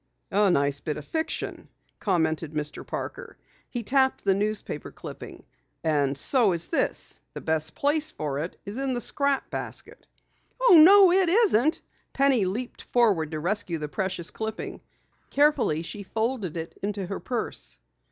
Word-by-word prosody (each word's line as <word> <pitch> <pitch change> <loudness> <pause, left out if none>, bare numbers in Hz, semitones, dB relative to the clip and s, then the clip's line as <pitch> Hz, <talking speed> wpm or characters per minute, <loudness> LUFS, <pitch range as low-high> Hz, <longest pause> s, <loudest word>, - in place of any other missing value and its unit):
"A 205 +1 +3
nice 140 -4 +1
bit 150 0 -4
of 150 - -8
fiction," 320 0 -4 0.3
commented 160 -5 0
Mr. 150 -1 -4
Parker. - - -7 0.3
He 240 -2 -4
tapped 265 +2 +2
the 195 - +4
newspaper 210 +2 -2
clipping. - - -10 0.4
"And 145 -4 +1
so 230 - +4
is 170 -1 -2
this. - - 0
The - - -6
best 160 0 0
place 300 +2 +2
for 145 - -4
it 165 +4 -5
is 205 +5 -4
in 270 -2 -1
the - - -1
scrap 280 +2 -1
basket." - - -4 0.5
"Oh, - - +6
no, 390 +1 +8
it 370 -1 +4
isn't!" 335 - +3 0.3
Penny 270 -7 +3
leaped 230 +7 -4
forward 205 -11 +2
to 155 -1 -4
rescue 180 0 0
the 150 -1 -5
precious 185 +1 -1
clipping. 220 0 -5 0.5
Carefully 285 - +2
she 205 +5 -5
folded 220 -4 -2
it 165 0 -7
into 200 -1 -3
her 195 +2 -5
purse. 240 -3 -4
205 Hz, 150 wpm, -26 LUFS, 160-265 Hz, 0.5 s, no